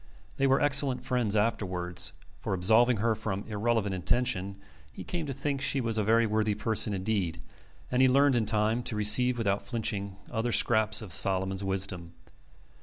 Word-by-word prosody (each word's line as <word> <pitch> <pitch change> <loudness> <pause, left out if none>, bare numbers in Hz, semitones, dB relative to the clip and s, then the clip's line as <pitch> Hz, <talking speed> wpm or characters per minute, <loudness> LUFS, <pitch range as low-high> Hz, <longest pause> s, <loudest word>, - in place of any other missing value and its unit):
They 135 - +2
were 135 +1 +3
excellent 135 -3 +1
friends 120 -5 0
afterwards; 90 -5 -1 0.3
for, - - -3
absolving 110 +6 +3
her 115 +2 +1
from 100 -2 -4
irreverent 110 -1 -1
intention, 95 0 -1 0.3
he - - -9
came 170 -4 -4
to - - -3
think 140 +1 -3
she 140 -1 +1
was 115 -3 -2
a - - +1
very 115 +2 +3
worthy 110 -1 0
person 110 0 -1
indeed; 95 -3 -2 0.5
and 125 +1 +2
he 130 - +6
learned 140 +1 +3
in 110 -3 0
time 110 +2 +1
to 125 - -3
receive 120 +4 +3
without 100 -3 -1
flinching 100 -5 -4 0.2
other 120 +1 -2
scraps 110 -1 +3
of 95 -5 -6
Solomon's 95 0 0
wisdom. 95 -3 -4
110 Hz, 170 wpm, -28 LUFS, 100-125 Hz, 0.5 s, he